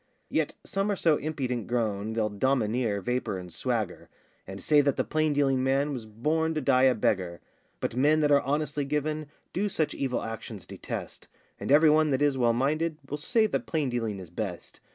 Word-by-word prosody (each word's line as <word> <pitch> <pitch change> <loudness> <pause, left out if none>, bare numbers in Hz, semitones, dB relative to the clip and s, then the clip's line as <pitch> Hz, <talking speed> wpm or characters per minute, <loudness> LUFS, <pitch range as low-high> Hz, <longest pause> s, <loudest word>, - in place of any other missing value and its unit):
Yet - - 0
some 195 +1 -1
are 205 - +1
so 160 -5 +3
impudent 130 -7 -3
grown, 110 -3 -1
They'll 110 -1 +1
domineer, 110 -2 0
vapour, 125 -2 -1
and 90 -2 -9
swagger, 110 -2 -2 0.4
And 95 +1 -7
say 150 +5 +4
that 140 -1 +1
the - - +2
plain 155 0 +1
dealing 135 -2 +2
man 135 +2 +1
Was 120 -4 -6
born 155 +9 0
to - - +1
die 130 -1 +4
a 130 -1 +5
beggar: 90 -5 0 0.4
But - - -2
men 150 +4 +4
that 150 -1 +3
are 140 -1 +6
honestly 145 +1 -1
given 150 +2 -2 0.3
Do 205 +3 0
such 155 -5 -1
evil 130 -3 -2
actions 115 -3 -7
detest, - - -7 0.3
And - - -3
every 150 +2 +7
one 155 0 +4
that 135 0 +1
is 145 -2 +3
well 120 -2 +3
minded 155 +6 0
Will 145 - -3
say 225 - +2
that 215 - -2
plain 155 -5 0
dealing 115 -4 -2
is 90 -3 -10
best. 90 -2 -5
135 Hz, 195 wpm, -28 LUFS, 115-150 Hz, 0.4 s, every